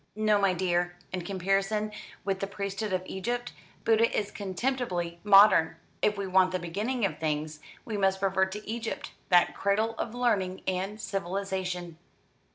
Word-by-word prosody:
"No, 215 -1 +3
my 190 -2 +3
dear. 175 -1 0 0.2
In 185 - -2
comparison 195 +3 0 0.3
with 195 -1 0
the 195 - -2
priesthood 200 +1 -4
of 185 -1 0
Egypt, 240 +7 -3 0.3
Buddha 230 +1 +4
is 205 - -1
contemptibly 190 -4 -2
modern. 200 -5 +7 0.3
If 210 0 +2
we 200 - -2
want 185 0 +4
the 185 - 0
beginning 205 +8 -2
of 165 -6 -3
things, 155 0 -2 0.3
we 215 -3 -3
must 190 -1 +2
revert 190 -1 +1
to 210 +1 -8
Egypt, 225 +1 -4 0.2
that 175 -2 +5
cradle 215 +3 +1
of 235 - -3
learning 200 -7 0
and 190 +3 -2
civilisation." 185 -3 -3
195 Hz, 155 wpm, -29 LUFS, 180-210 Hz, 0.3 s, modern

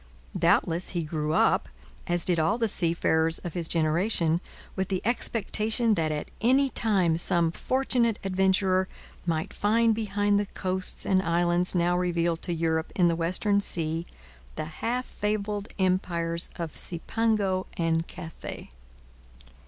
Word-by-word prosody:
Doubtless 175 0 +2
he 170 - 0
grew 155 0 -2
up, - - +2 0.4
as 175 -1 +1
did 175 -2 +4
all 160 +7 +2
the 230 -2 +1
seafarers 165 -3 +2
of 175 - -7
his 170 -2 -1
generation, 165 +1 +1 0.3
with 190 -1 -1
the 190 -2 -2
expectation 225 0 +1
that 160 -5 0
at 150 -1 -4
any 265 +4 +3
time 185 -7 +1
some 170 -2 +3
fortunate 245 0 0
adventurer 190 0 +2 0.4
might 160 -1 -1
find 225 +2 +2
behind 205 -1 +1
the 205 - -2
coasts 185 -1 -2
and 185 -1 +3
islands 175 +1 +2
now 175 0 +2
revealed 170 -2 0
to 175 - -3
Europe 160 -1 -1
in 175 -2 +4
the 165 - +1
western 185 +5 +1
sea 165 -2 0 0.5
the 155 - -3 0.2
half 250 +2 -1
fabled 210 0 -3
empires 175 -3 0
of 165 -3 -5
Cipango 195 +1 0
and 165 -1 0
Cathay. 165 -3 -8
180 Hz, 135 wpm, -27 LUFS, 165-205 Hz, 0.5 s, did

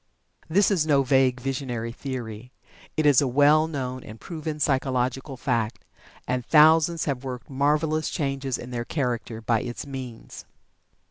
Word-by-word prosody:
This 200 +6 +3
is 165 -6 +1
no 140 -3 +4
vague, 130 -1 +3
visionary 125 -3 -3
theory. 125 -2 -6 0.5
It 155 - +1
is 145 -3 +6
a 140 - +1
well 145 +4 +4
known 130 -4 -4
and 110 +1 -11
proven 155 -3 -5
psychological 130 -1 0
fact, 120 -3 -2 0.4
and 125 0 -1
thousands 160 +3 +5
have 135 -3 -2
worked 130 0 -7
marvelous 150 +3 +1
changes 135 -4 -2
in 125 - -9
their 120 -1 -2
character 120 -4 -3
by 115 0 +1
its 120 +2 -6
means. 130 -4 -8
135 Hz, 145 wpm, -25 LUFS, 125-150 Hz, 0.5 s, is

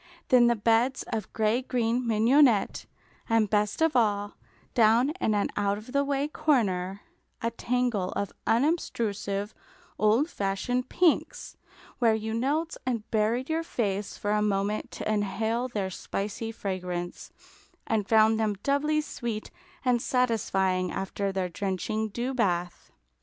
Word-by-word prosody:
Then 245 -2 +6
the 235 - +3
beds 230 +4 +2
of 215 -3 -3
gray 220 +3 +1
green 245 -1 0
mignonette; 230 0 +3 0.4
and 225 -1 +3
best 210 +7 +1
of 320 -1 +2
all, 205 -3 +1 0.4
down 235 +4 +4
in 215 - +2
an 205 - +1
out 200 0 +1
of 215 +4 -10
the 280 +1 +2
way 280 0 0
corner, 205 -12 0 0.4
a 230 - -1
tangle 235 -5 -1
of 200 - -3
unobtrusive 220 - 0 0.5
old 220 +8 +3
fashioned 245 - -2
pinks, 365 +8 +1 0.4
where 230 -3 +4
you 220 0 -3
knelt 295 +8 -1
and 235 -4 -2
buried 225 +4 +1
your 320 +1 0
face 205 -10 -2
for 205 - -2
a 210 0 +2
moment 205 0 0
to - - -6
inhale 220 +3 0
their 205 -6 -3
spicy 210 +4 -4
fragrance, 180 -4 -5 0.5
and 215 -3 -1
found 220 0 +5
them 215 -2 +1
doubly 300 +2 +2
sweet 235 -7 -5 0.3
and 245 -2 +3
satisfying 195 -8 +1
after 195 +1 -2
their 190 -1 -1
drenching 195 +4 -2
dew 240 +5 -3
bath. 180 -7 -1
220 Hz, 135 wpm, -27 LUFS, 200-250 Hz, 0.5 s, Then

